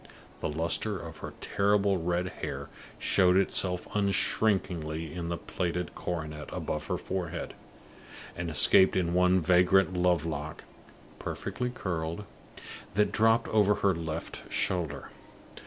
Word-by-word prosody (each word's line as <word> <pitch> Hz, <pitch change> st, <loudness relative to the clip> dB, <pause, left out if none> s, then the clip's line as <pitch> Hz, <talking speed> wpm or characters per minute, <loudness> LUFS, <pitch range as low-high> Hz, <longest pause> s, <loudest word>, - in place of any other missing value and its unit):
The -, -, -2 dB
luster 85 Hz, +7 st, 0 dB
of 80 Hz, -3 st, -8 dB
her -, -, -8 dB
terrible 100 Hz, -1 st, +2 dB
red 90 Hz, +2 st, 0 dB
hair -, -, -4 dB, 0.3 s
showed 90 Hz, -1 st, +3 dB
itself 90 Hz, -2 st, +1 dB
unshrinkingly 90 Hz, -6 st, 0 dB
in 85 Hz, -1 st, -4 dB
a 85 Hz, -, -1 dB
plaited 90 Hz, 0 st, -3 dB
coronet 80 Hz, -3 st, -5 dB
above 75 Hz, -, -3 dB
her -, -, -1 dB
forehead, 90 Hz, -3 st, -4 dB, 0.8 s
and 85 Hz, -1 st, -3 dB
escaped 95 Hz, +4 st, +5 dB
in 85 Hz, -2 st, 0 dB
one 90 Hz, +1 st, +4 dB
vagrant 90 Hz, +2 st, +4 dB
love 90 Hz, -3 st, +2 dB
lock, 75 Hz, -1 st, -5 dB, 0.6 s
perfectly 125 Hz, 0 st, -3 dB
curled, 85 Hz, -5 st, -3 dB, 0.7 s
that 105 Hz, -1 st, +3 dB
dropped 115 Hz, +2 st, +3 dB
over 105 Hz, -1 st, +4 dB
her 100 Hz, -1 st, +2 dB
left 80 Hz, -1 st, -5 dB
shoulder. 90 Hz, -5 st, -1 dB
90 Hz, 125 wpm, -29 LUFS, 85-100 Hz, 0.8 s, escaped